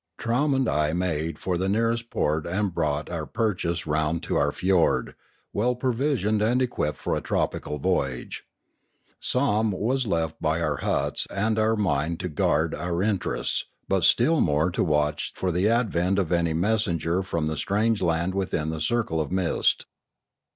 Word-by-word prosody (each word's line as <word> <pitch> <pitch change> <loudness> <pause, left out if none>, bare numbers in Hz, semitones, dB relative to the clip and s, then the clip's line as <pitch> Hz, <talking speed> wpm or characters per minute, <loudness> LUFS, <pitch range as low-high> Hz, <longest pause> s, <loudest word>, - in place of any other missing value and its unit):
Trowm 130 +5 +1
and 130 -2 +1
I 75 -3 +1
made 80 -3 -1
for 90 -2 -2
the 95 +1 0
nearest 115 +2 0
port 75 +1 0
and 95 +1 -1
brought 75 -3 -1
our 80 -3 -4
purchase 90 -6 -1
round 80 +1 0
to - - -2
our 70 0 +2
fiord, 90 +1 +1 0.4
well 125 +4 +1
provisioned 125 -4 0
and 120 +4 +2
equipped 120 -12 -1
for - - -2
a - - -2
tropical 75 - -2
voyage. 70 -6 -2 0.8
Somm 110 -5 +1
was 130 +3 0
left 80 -4 -1
by 80 +1 +1
our 75 -4 0
huts - - -1
and 105 +2 0
our 110 +1 +3
mine 85 -5 0
to 90 - -4
guard 75 +1 +1
our 85 +2 -2
interests, 100 -3 -1 0.2
but - - +1
still 155 +7 +4
more 75 +4 +2
to - - 0
watch 75 -2 0
for 95 - -1
the 90 +5 +2
advent 100 -6 +1
of 95 -4 0
any 85 -2 +2
messenger 90 -2 +1
from 85 -4 -2
the 80 0 -1
strange 105 +7 +1
land 85 +1 +1
within 90 -5 -1
the 80 -1 -4
circle 95 -4 0
of 75 - -4
mist. 95 -2 +1
90 Hz, 165 wpm, -25 LUFS, 80-110 Hz, 0.8 s, still